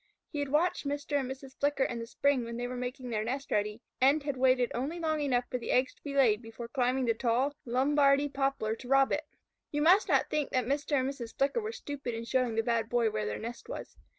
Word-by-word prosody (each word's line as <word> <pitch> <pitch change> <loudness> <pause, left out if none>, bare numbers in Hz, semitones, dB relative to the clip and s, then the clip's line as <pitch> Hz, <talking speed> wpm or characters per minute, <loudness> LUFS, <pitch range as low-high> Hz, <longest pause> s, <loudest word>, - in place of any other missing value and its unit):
He 295 - -3
had 285 -1 -2
watched 300 +1 +1
Mr. 285 0 -1
and 260 -2 -3
Mrs. 265 0 -8
Flicker 285 -1 +2
in 240 -2 -2
the 230 - -6
spring 275 +1 +1
when 235 0 -5
they 245 - -2
were 250 - -5
making 250 0 -5
their 215 -1 0
nest 270 +5 -4
ready, 210 +3 -1 0.2
and 280 +3 +4
had 285 -2 -2
waited 255 -1 +3
only 285 +8 -3
long 315 -2 0
enough 250 -4 +1
for 250 - -1
the - - -7
eggs 255 +1 +2
to - - -31
be 280 -1 -6
laid 235 -6 +4
before 225 0 -8
climbing 255 +1 +1
the 230 - +3
tall 245 +4 +1
Lombardy 275 +3 +3
poplar 270 -6 -1
to 245 - -11
rob 270 +1 +4
it. 300 +1 -1 0.4
You 295 0 0
must 370 +7 +6
not - - +2
think 300 -2 0
that 255 -2 0
Mr. 285 +4 -1
and 260 - 0
Mrs. 245 -4 -6
Flicker 280 +12 +1
were 435 +1 -3
stupid 285 - -5
in 230 +1 -5
showing 250 -2 +1
the 225 - +2
Bad 230 -1 0
Boy 235 -2 +2
where 105 - -2
their 105 - -3
nest 235 - -7
was. - - -7
260 Hz, 245 wpm, -30 LUFS, 235-285 Hz, 0.4 s, must